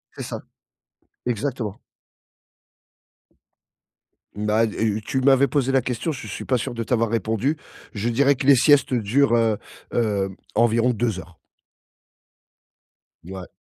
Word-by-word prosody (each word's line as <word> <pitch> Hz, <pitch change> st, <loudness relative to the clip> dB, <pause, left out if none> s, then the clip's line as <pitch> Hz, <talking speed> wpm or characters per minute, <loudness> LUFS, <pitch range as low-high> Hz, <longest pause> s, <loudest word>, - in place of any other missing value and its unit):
C'est -, -, -6 dB
ça, -, -, -6 dB, 0.9 s
exactement. 120 Hz, -3 st, -3 dB, 2.6 s
Bah 105 Hz, +2 st, +2 dB
heu, 110 Hz, 0 st, -1 dB
tu 130 Hz, -, -1 dB
m'avais 135 Hz, +1 st, +5 dB
posé 135 Hz, -2 st, 0 dB
la 135 Hz, -1 st, +3 dB
question, 125 Hz, +7 st, -2 dB
je 140 Hz, -, -7 dB
suis -, -, -6 dB
pas 130 Hz, -, +2 dB
sûr 120 Hz, -, -4 dB
de 115 Hz, -, -3 dB
t'avoir 115 Hz, -1 st, +1 dB
répondu. 115 Hz, +7 st, 0 dB, 0.4 s
Je 110 Hz, +2 st, -2 dB
dirais 140 Hz, +4 st, +3 dB
que 135 Hz, -, -4 dB
les 140 Hz, -, +7 dB
siestes 140 Hz, 0 st, +4 dB
durent, 120 Hz, +3 st, +2 dB
heu 115 Hz, -2 st, +2 dB, 0.4 s
heu, 100 Hz, -4 st, 0 dB, 0.3 s
environ 115 Hz, +1 st, +3 dB
2 110 Hz, -3 st, -1 dB
heures. 85 Hz, -1 st, -13 dB, 1.9 s
Ouais. 95 Hz, 0 st, -8 dB
115 Hz, 130 wpm, -23 LUFS, 110-135 Hz, 2.6 s, les